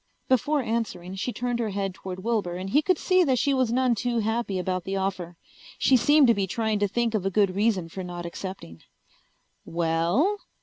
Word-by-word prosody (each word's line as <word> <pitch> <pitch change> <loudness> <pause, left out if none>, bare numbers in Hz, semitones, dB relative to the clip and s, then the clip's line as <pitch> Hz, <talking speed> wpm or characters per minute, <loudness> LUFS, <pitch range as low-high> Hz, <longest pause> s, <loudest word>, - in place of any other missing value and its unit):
Before 280 +3 +2
answering 220 -6 -3
she 195 +6 -3
turned 245 0 -2
her 225 -2 -1
head 195 -1 -2
toward 185 +1 -8
Wilbur 210 -6 -1
and 185 +2 -5
he 295 - +4
could 370 +2 +1
see 370 +2 +3
that 265 -6 +2
she 280 +4 +2
was 255 -3 +1
none 255 0 +2
too 240 +1 -1
happy 220 -2 -1
about 185 0 -2
the 195 +2 -3
offer. 185 -3 -3 0.4
She 265 - +4
seemed 290 +4 +5
to 235 - +5
be 200 -3 -1
trying 220 +1 -1
to 205 - +2
think 235 +3 -1
of 215 -4 0
a 195 - +1
good 195 -1 +2
reason 200 -3 +1
for 185 +3 -7
not 175 -1 -6
accepting. 170 - -7 0.8
"Well?" 170 - +1
210 Hz, 205 wpm, -26 LUFS, 185-245 Hz, 0.8 s, seemed